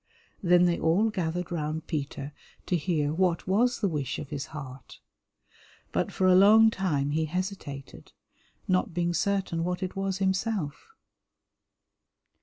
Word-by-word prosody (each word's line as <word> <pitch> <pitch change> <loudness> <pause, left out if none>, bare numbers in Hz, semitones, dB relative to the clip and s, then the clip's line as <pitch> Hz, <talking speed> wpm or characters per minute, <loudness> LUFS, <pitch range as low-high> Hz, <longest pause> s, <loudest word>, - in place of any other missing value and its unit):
Then 180 -2 +5
they 175 -1 +1
all 195 +8 +2
gathered 180 -2 -3
round 155 -1 -3
Peter 145 -2 -4 0.3
to 180 - 0
hear 155 -3 0
what 175 0 +1
was 235 +6 +2
the 205 - +2
wish 145 -6 -2
of 140 - -8
his 145 0 -4
heart, 135 -4 -10 0.9
but - - -1
for 190 - 0
a 185 - +6
long 215 +4 +7
time 145 -9 -1
he 160 +1 0
hesitated, 170 -5 -6 0.6
not 185 -2 +1
being 175 0 0
certain 190 -3 0
what 180 +1 -2
it 185 - -4
was 195 -1 -2
himself. 190 -4 -1
175 Hz, 140 wpm, -28 LUFS, 150-190 Hz, 0.9 s, long